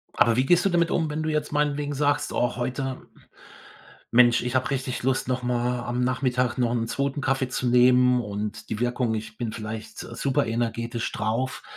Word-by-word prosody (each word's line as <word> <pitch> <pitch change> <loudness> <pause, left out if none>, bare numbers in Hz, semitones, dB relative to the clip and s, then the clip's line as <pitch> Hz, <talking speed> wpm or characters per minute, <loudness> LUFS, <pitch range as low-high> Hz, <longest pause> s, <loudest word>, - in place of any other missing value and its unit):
Aber 115 - +4
wie 130 +2 +2
gehst 175 +5 +4
du - - +4
damit 170 -2 +2
wenn 155 -1 -1
du 155 - -1
jetzt 150 -1 -1
meinetwegen 145 -1 0
sagst: 145 0 0
„Oh, 120 - 0
heute, 130 +2 -4 1.0
Mensch, 120 0 +5
ich 125 +1 -3
hab 130 - +1
richtig 130 -2 -2
Lust 130 -1 0
noch 125 0 -1
mal 125 0 0
am 120 +1 -2
Nachmittag 125 -1 0
noch 120 -2 +1
'n 115 -1 -1
2. 140 +2 -2
Kaffee 135 -1 0
zu 125 - -2
nehmen 125 0 +5
und 105 -1 -5
die 110 - -3
Wirkung 120 -1 0
ich 110 0 -6
bin 115 -3 -3
vielleicht 110 0 -7
super 135 -2 -1
energetisch 115 0 -2
drauf.“ 115 +4 -2
125 Hz, 185 wpm, -25 LUFS, 120-135 Hz, 1.0 s, Mensch